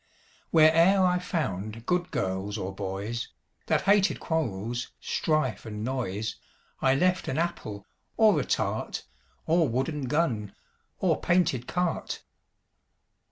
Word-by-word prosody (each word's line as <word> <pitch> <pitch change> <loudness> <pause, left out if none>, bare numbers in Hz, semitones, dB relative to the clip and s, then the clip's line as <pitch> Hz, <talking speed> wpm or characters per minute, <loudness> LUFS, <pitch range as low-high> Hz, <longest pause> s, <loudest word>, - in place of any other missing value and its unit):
Where 160 -1 +6
e'er 190 +3 +5
I 180 0 +3
found 115 - -3
good 180 +2 0
girls 95 +2 -2
or 95 -1 -4
boys, 100 +4 -4 0.4
That - - +2
hated 200 0 +3
quarrels, 120 - -2
strife 155 -7 0
and 105 -1 -6
noise, 110 -4 -2 0.4
I 130 0 +4
left 180 +4 +2
an 130 - -1
apple, 135 - -3 0.3
or 220 -2 +5
a - - 0
tart, - - -2 0.4
Or 165 -2 +3
wooden 135 +4 -1
gun, 125 -9 0 0.4
or - - +1
painted 170 -9 +2
cart. 180 -2 -2
130 Hz, 120 wpm, -28 LUFS, 105-170 Hz, 0.4 s, Where